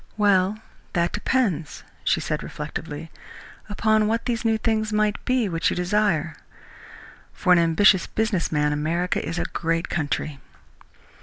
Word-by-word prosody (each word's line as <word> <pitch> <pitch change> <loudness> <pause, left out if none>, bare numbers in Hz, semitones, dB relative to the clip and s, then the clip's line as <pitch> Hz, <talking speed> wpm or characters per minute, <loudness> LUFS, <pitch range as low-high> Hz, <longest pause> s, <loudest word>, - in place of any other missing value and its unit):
"Well, 200 -1 +3 0.4
that 170 0 +1
depends," 205 - -1 0.2
she - - +2
said - - -2
reflectively, 150 +1 -6 0.6
"upon 215 0 +2
what 230 +1 -1
these 235 -2 -1
new 225 -1 +2
things 220 -1 0
might 210 -1 0
be 255 -3 +1
which 165 -2 0
you - - -2
desire. 180 -4 +1 1.0
For 180 - +3
an 175 - +5
ambitious 170 +3 +4
business 220 -6 -1
man 150 -1 +1
America 165 +5 -1
is 170 - -4
a - - -1
great 165 0 -2
country." 145 -2 -2
185 Hz, 140 wpm, -24 LUFS, 165-215 Hz, 1.0 s, an